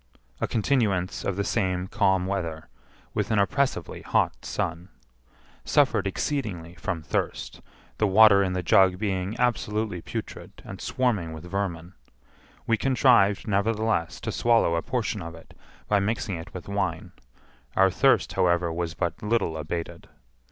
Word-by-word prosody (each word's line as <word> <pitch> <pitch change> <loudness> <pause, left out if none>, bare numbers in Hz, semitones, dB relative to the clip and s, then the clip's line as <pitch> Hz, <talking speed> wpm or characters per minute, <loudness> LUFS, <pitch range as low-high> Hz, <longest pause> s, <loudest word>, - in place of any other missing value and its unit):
A - - 0
continuance 105 -6 0
of 100 - -1
the 100 - -1
same 95 -4 0
calm 95 -2 +1
weather, 85 -5 -4 0.4
with - - -1
an 110 - +1
oppressively 140 +7 0
hot - - 0
sun. 85 +4 -3 0.7
Suffered 115 -8 +2
exceedingly 95 - -3
from 90 -4 -4
thirst, - - -3 0.4
the 105 - +3
water 100 0 +7
in 95 -2 0
the 90 -1 -2
jug 90 +2 +4
being 95 0 -2
absolutely 110 -6 -1
putrid - - -7
and - - -8
swarming 105 -11 -1
with 80 0 -9
vermin. 90 -2 -4 0.7
We 115 - +2
contrived, 120 -5 +3
nevertheless, 100 -4 0
to 110 - -3
swallow 115 -6 +3
a 85 - +1
portion 115 -3 -2
of 85 -1 -7
it 80 - -16 0.3
by 105 - +3
mixing 105 0 -1
it 80 0 -8
with 90 - -9
wine; 100 -4 -2 0.6
our 95 0 +5
thirst, - - +3
however, 85 -1 +2
was 85 -1 -3
but 85 -2 -2
little 105 -6 0
abated. 85 +2 -5
95 Hz, 145 wpm, -26 LUFS, 85-110 Hz, 0.7 s, water